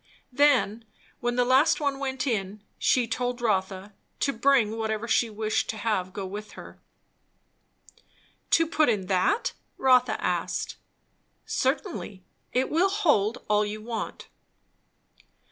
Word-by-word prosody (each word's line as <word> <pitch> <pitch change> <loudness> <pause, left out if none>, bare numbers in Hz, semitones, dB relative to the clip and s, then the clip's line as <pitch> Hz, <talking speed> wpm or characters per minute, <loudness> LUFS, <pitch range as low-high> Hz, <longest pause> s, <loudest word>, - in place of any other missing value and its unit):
Then, 250 -5 +3 0.4
when 240 0 -1
the 245 0 +2
last 270 +6 +4
one 280 -2 -1
went 265 -2 -2
in, 210 -4 -2 0.2
she 250 -2 +3
told 245 +1 -2
Rotha 195 -3 -1 0.3
to 275 - +1
bring 230 -3 +3
whatever 220 0 -2
she 230 +1 +2
wished 215 0 -1
to 220 - -3
have 200 -5 -1
go 195 0 -5
with 210 +3 -7
her. - - -12 1.7
"To 330 - +4
put 310 -3 +2
in 205 -5 0
that?" 195 - +1 0.2
Rotha 255 -1 +3
asked. - - -2 0.7
"Certainly. 260 - -2 0.3
It 255 +1 0
will 350 +5 +3
hold 295 - +1
all 210 0 +3
you 210 +1 -4
want." 225 +1 -6
235 Hz, 130 wpm, -26 LUFS, 210-265 Hz, 1.7 s, last